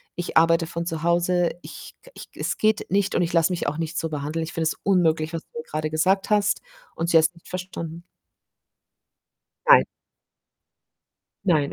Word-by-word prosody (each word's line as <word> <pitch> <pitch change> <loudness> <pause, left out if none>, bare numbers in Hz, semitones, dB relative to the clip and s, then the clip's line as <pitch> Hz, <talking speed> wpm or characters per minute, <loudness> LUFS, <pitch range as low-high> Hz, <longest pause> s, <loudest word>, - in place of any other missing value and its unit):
Ich 175 - -2
arbeite 165 +1 +4
von 170 0 -4
zu 165 -2 -4
Hause. 175 0 +2
Ich - - -11
k - - -17
ich - - -10
es - - -2
geht 215 0 +1
nicht 200 +1 +1
und - - +2
ich 170 - -1
lasse 165 +1 +3
mich 175 - -2
auch 145 - -2
nicht 165 -1 -3
so 165 - -3
behandeln. 150 +2 -3
Ich 160 - -7
finde 165 - -1
es - - 0
unmöglich, 165 -4 +2
was 165 - -3
du 155 - -10
mir - - -6
grade 155 0 -3
gesagt 190 +6 +1
hast“ 205 0 +2 0.3
und 165 +1 -2
sie 165 - +6
hat's 160 +1 +3
nicht 170 - -18
verstanden. 170 -2 -6 1.7
Nein. - - +8 1.6
Nein, 155 -7 +2
165 Hz, 185 wpm, -24 LUFS, 160-180 Hz, 1.7 s, Nein